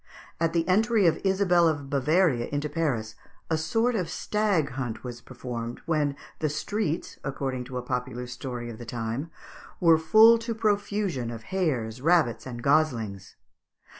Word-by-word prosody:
At 165 0 +1
the 165 -1 +1
entry 215 +2 +3
of 165 -2 +3
Isabel 190 -3 +3
of 145 -3 -1
Bavaria 145 -1 +2
into 145 +1 -2
Paris, 140 -9 -1 0.4
a - - +4
sort 225 +10 +1
of 185 -7 -1
stag 205 -9 0
hunt 125 -4 -4
was 120 -1 -7
performed, 120 -2 -6
when 150 -4 +1 0.2
"the 155 - 0
streets," 165 +3 -3
according 135 -2 -3
to 125 0 -6
a 125 - -4
popular 125 0 -3
story 125 0 -6
of 110 - -10
the - - -7
time, 115 +6 -4 0.5
"were 165 -2 +5
full 220 +7 +7
to 230 0 -4
profusion 205 - 0
of 115 -1 -7
hares, 125 -11 -1
rabbits, 160 -7 +2
and 120 -2 -7
goslings." 115 -10 +1
150 Hz, 155 wpm, -27 LUFS, 125-180 Hz, 0.5 s, full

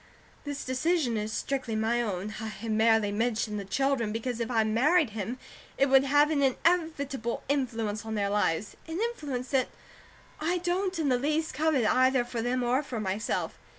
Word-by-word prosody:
This 285 -1 -4
decision 260 0 +1
is 215 0 -2
strictly 255 -1 -2
my 225 +2 +1
own. 205 -2 -3
I 220 -1 -6
merely 220 -1 +3
mention 220 0 -1
the 200 - -5
children, 250 +1 0
because 230 +2 -3
if 230 0 -2
I 225 -3 +3
married 260 +6 +3
him, 220 +3 -4 0.4
it 275 - +3
would 270 0 +6
have 290 +2 +4
an 290 -2 +1
inevitable 280 -4 0
influence 230 -7 -1
on 220 0 -4
their 200 -1 0
lives, 205 -2 0
an 325 +2 -4
influence 290 - -3
that 265 -2 +2 0.7
I 345 +4 0
don't 360 +1 -1
in 310 -4 0
the 250 -1 +2
least 305 +4 0
covet 300 -4 +2
either 255 +1 +3
for 240 -1 -4
them 245 +2 0
or 250 +3 +2
for 255 -6 -5
myself. 205 +1 -2
250 Hz, 175 wpm, -28 LUFS, 220-285 Hz, 0.7 s, would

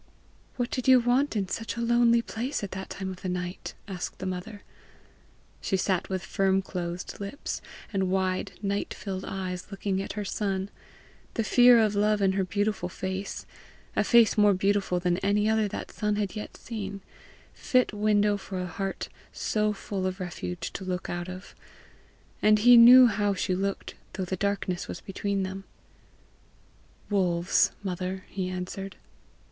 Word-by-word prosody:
"What 245 -1 -2
did 255 - -2
you 260 -1 +8
want 245 +3 +2
in 200 -3 0
such 225 +4 -4
a - - -2
lonely 235 0 +4
place 240 +3 -3
at 200 - -4
that 190 0 -6
time 190 -1 -4
of 185 - -10
the 185 - -3
night?" 180 0 -4
asked 185 -3 -5
the 190 - -6
mother. 185 +3 -5 1.0
She 190 - 0
sat 185 -1 0
with 190 -1 -2
firm 195 0 +1
closed 175 -1 -5
lips, 200 +8 -5 0.3
and 190 -2 +1
wide, 185 -1 0
night 200 0 -2
filled 190 -1 -5
eyes 185 -2 -4
looking 195 -1 -2
at - - -5
her 210 -1 -4
son, 195 -1 -2 0.6
the 225 - +1
fear 245 +2 +7
of 215 -2 +3
love 210 +1 +2
in 195 -1 +3
her 190 0 0
beautiful 205 -1 -1
face 190 +2 -4 0.5
a - - +3
face 235 -3 +5
more 205 -1 +6
beautiful 195 -1 +1
than 175 0 0
any 205 +1 +2
other 220 -1 +2
that 205 - -6
son 210 -1 -1
had 205 -2 -2
yet 210 - -7
seen, 200 -4 -6 0.5
fit 255 -4 +1
window 210 0 +2
for 190 -1 -6
a 180 - -2
heart 195 +3 -4 0.2
so 215 -1 0
full 195 -2 -3
of 185 +1 -4
refuge 175 -1 -5
to 190 - -5
look 185 -1 -3
out 175 +1 -4
of; 185 +1 -9 0.9
and 215 0 +5
he 245 0 +10
knew 245 +2 +10
how 205 -3 +1
she 185 0 -1
looked 195 +2 -2 0.2
though 190 -1 -3
the 190 - -2
darkness 195 -2 -2
was - - -6
between 200 0 -2
them. 190 +1 -5 1.5
"Wolves, 180 -3 +3
mother," 185 0 -4
he 185 -2 -3
answered. 185 +1 -5
195 Hz, 165 wpm, -27 LUFS, 185-210 Hz, 1.5 s, he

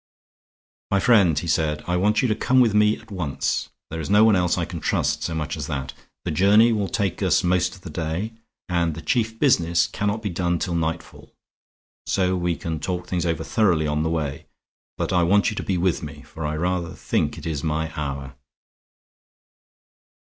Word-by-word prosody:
"My 100 - +2
friend," 95 -9 +4
he 80 - -1
said, 75 -2 0
"I 90 - 0
want 105 +6 +2
you - - +3
to 110 - +2
come 130 +4 +2
with 115 -4 +4
me 105 +1 +4
at 110 -1 -17
once; 85 -8 -2 0.2
there 80 - -4
is 80 - -5
no 105 +2 +6
one 110 -2 +5
else 90 -2 +1
I - - 0
can - - -6
trust - - 0
so 80 - -3
much 75 -1 -3
as 75 -3 -5
that. 65 -4 -4 0.3
The - - -1
journey 105 +8 +5
will 105 -3 -1
take 100 -5 -1
us - - +3
most 90 +1 +1
of 95 - -16
the 90 - -9
day, 80 +8 -3 0.3
and 85 -3 0
the 80 - -8
chief 115 +5 0
business 85 - +3
cannot 105 +2 -2
be 100 - -2
done 85 0 0
till 85 +1 -2
nightfall. 80 0 -4 0.7
So 95 -1 +1
we 90 -1 0
can 80 -1 -4
talk 90 +2 -3
things 90 -1 -1
over 80 -1 -1
thoroughly 85 -4 +2
on 75 0 0
the 80 - 0
way. 75 -4 -3 0.5
But - - -2
I 90 - +4
want 100 +6 +3
you - - -6
to - - -1
be 95 - -1
with 90 0 +1
me; 75 -1 -8
for 80 -2 -6
I 75 - -2
rather 90 +1 -2
think - - -1
it - - -9
is 75 -4 -3
my 80 0 -1
hour." 70 -2 -4
85 Hz, 205 wpm, -23 LUFS, 80-100 Hz, 0.7 s, no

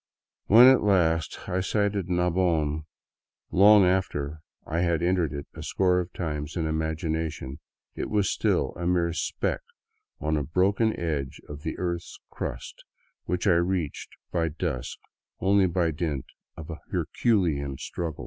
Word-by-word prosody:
When 115 +5 +9
at 130 0 +7
last 85 -6 +1
I 90 - 0
sighted 100 -1 0
Nabon, 85 -4 +1 0.7
long 100 +1 +7
after 80 -5 -1 0.2
I 80 +1 -2
had 85 -1 +1
entered 90 -4 +1
it 70 0 -5
a - - -9
score 90 -1 +2
of 90 0 -4
times 75 -3 -4
in 80 - 0
imagination, 80 -2 -2 0.3
it - - -4
was 105 -3 +1
still - - +1
a 85 0 -3
mere 85 -2 +1
speck 85 - -2 0.6
on 80 0 0
a 75 - -1
broken 100 - +1
edge 75 -6 -3
of 75 0 -8
the 80 - -4
earth's 85 -1 -4
crust - - -6 0.4
which 90 +1 -2
I 100 - +5
reached 85 -3 -1 0.2
by 85 -1 +1
dusk 65 -5 -3 0.4
only 95 0 +4
by 85 -2 +1
dint 75 -4 -3 0.3
of 80 +1 -8
a 80 - -7
herculean 80 - 0
struggle. 80 0 -5
85 Hz, 145 wpm, -26 LUFS, 80-95 Hz, 0.7 s, When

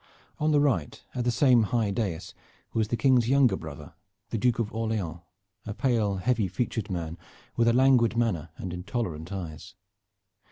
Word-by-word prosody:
On 155 +1 +2
the 150 - +4
right, 120 - 0
at 125 -1 -2
the - - +3
same 125 0 +5
high 110 -1 0
dais, 95 -6 -3 0.4
was 110 -1 +1
the 120 - -1
King's 125 -3 +3
younger 135 -2 +4
brother, 75 -2 -9 0.4
the 115 - -1
Duke 120 +2 +2
of 115 -3 -2
Orleans, 110 -7 -2 0.5
a 105 - -4
pale 115 -6 +1
heavy 110 +1 +1
featured 110 +2 -3
man, 85 -2 -4 0.4
with 115 0 +2
a 115 - +5
languid 125 -3 +4
manner 90 -10 0
and 90 -1 -5
intolerant 90 -3 -4
eyes. 85 -3 -7
110 Hz, 165 wpm, -27 LUFS, 90-120 Hz, 0.5 s, same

